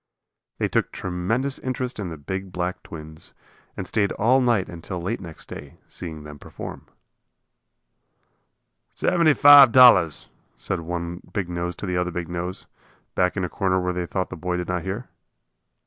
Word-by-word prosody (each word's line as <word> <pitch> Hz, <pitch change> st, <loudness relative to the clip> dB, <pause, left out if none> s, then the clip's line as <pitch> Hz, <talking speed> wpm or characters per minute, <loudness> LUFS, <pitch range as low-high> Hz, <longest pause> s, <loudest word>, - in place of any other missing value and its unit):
They -, -, 0 dB
took -, -, 0 dB
tremendous 105 Hz, +10 st, -2 dB
interest 130 Hz, -2 st, -3 dB
in 95 Hz, -4 st, -3 dB
the 80 Hz, -, -7 dB
big 95 Hz, +6 st, -5 dB
black 90 Hz, +1 st, -3 dB
twins, 80 Hz, -1 st, -10 dB, 0.4 s
and -, -, -4 dB
stayed 100 Hz, -2 st, 0 dB
all 125 Hz, +5 st, +3 dB
night 120 Hz, -7 st, +2 dB
and 85 Hz, -2 st, -10 dB
till 90 Hz, -, -5 dB
late 100 Hz, +7 st, -3 dB
next 85 Hz, -3 st, -10 dB
day, 70 Hz, 0 st, -10 dB
seeing 80 Hz, -3 st, -8 dB
them 75 Hz, -1 st, -10 dB
perform. -, -, -9 dB, 2.1 s
"Seventy 170 Hz, -5 st, +3 dB
five 145 Hz, -3 st, +9 dB
dollars," 115 Hz, -, +6 dB, 0.3 s
said 95 Hz, -, -3 dB
one 85 Hz, +1 st, -5 dB
big 95 Hz, -5 st, -2 dB
nose 85 Hz, 0 st, -3 dB
to -, -, -6 dB
the 90 Hz, -2 st, -1 dB
other 90 Hz, 0 st, 0 dB
big 90 Hz, -1 st, -5 dB
nose, 90 Hz, +1 st, -4 dB, 0.5 s
back 90 Hz, +2 st, +1 dB
in 95 Hz, -, 0 dB
a -, -, -2 dB
corner 95 Hz, 0 st, 0 dB
where 90 Hz, 0 st, -1 dB
they 90 Hz, -1 st, -3 dB
thought 95 Hz, +1 st, -3 dB
the -, -, -5 dB
boy 90 Hz, +1 st, -2 dB
did 90 Hz, 0 st, -4 dB
not 90 Hz, -1 st, -1 dB
hear. 100 Hz, +8 st, -5 dB
90 Hz, 170 wpm, -24 LUFS, 85-105 Hz, 2.1 s, five